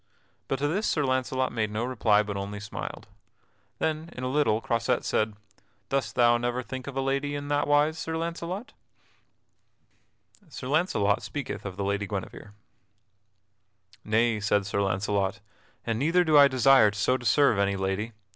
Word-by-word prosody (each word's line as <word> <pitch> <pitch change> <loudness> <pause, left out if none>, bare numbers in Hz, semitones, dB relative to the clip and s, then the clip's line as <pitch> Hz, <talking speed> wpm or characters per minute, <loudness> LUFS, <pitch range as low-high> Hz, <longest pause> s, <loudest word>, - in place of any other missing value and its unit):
But 135 - -1
to 145 +2 0
this 195 +8 -1
Sir 150 - +1
Launcelot 130 0 0
made 110 -2 -1
no 110 +3 -2
reply 110 -4 +2
but 105 -1 -5
only 100 +1 -5
smiled. 105 0 -7 0.7
Then 160 +1 -2
in 125 - -7
a 130 - -1
little 145 -6 +2
Croisette 115 +2 -1
said: 110 -1 0 0.5
"Dost 135 -1 -1
thou 120 -1 +4
never 120 +1 -2
think 130 +2 -7
of 135 -1 -6
a - - +1
lady 140 +2 -1
in 145 0 -5
that 145 0 +1
wise, 150 +2 +2
Sir 160 0 -3
Launcelot?" 170 +9 -5 1.7
[Sidenote: 185 -8 -24
Sir 130 - -6
Launcelot 140 - +1
speaketh 140 -7 -5
of 95 -1 -8
the 100 - -2
Lady 100 +1 -1
Guinevere] 100 +1 -6 1.5
"Nay," 110 +1 +1
said 100 0 +1
Sir 100 0 -1
Launcelot, 100 +1 -1 0.5
"and 115 -1 -1
neither 165 +6 +3
do 155 -3 +2
I 145 -1 +9
desire 130 -4 +5
so 110 +4 +1
to 125 - -5
serve 120 -2 +3
any 100 0 +1
lady. 95 +4 -2
125 Hz, 165 wpm, -27 LUFS, 105-145 Hz, 1.7 s, I